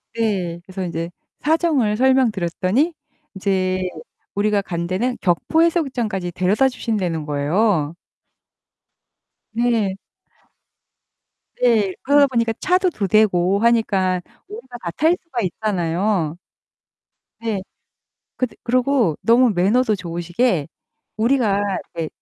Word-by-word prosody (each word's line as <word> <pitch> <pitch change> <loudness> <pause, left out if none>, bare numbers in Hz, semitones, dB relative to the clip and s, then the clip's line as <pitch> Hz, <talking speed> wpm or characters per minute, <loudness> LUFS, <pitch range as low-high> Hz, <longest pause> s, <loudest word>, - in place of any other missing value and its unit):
이 230 - -2
네. 180 -6 -1
그래서 190 0 -5
인제 170 -1 -3 0.3
사정을 295 -9 +1
설명드렸더니 250 - +2 0.4
인제 185 -1 0 0.5
우리가 205 0 +2
간 170 -3 -4
데는 240 +8 -1
격포 200 - +2
해수욕장까지 245 - -1
데려다 190 +9 +2
주신다는 185 -11 -2
거예요. 155 +2 +1 1.6
네. 225 -5 +1 1.6
네. 215 -6 +3
그러다 285 +1 +5
보니까 230 -3 0
차도 370 0 +2
2 200 -10 -2
대고 195 -2 +3
하니까 200 -6 +2 0.3
우리가 260 - -9
다 170 - -4
탈 320 - +2
수가 330 -10 -4
있잖아요. 180 -3 -1 1.0
네. 220 -4 -2 0.7
그때 255 -2 -2
그리고 250 - +2
너무 240 +1 +4
매너도 210 +5 +2
좋으시게 175 - -1 0.5
우리가 220 -3 +2 0.4
이제 165 -2 -2
210 Hz, 240 characters per minute, -21 LUFS, 180-250 Hz, 1.6 s, 그러다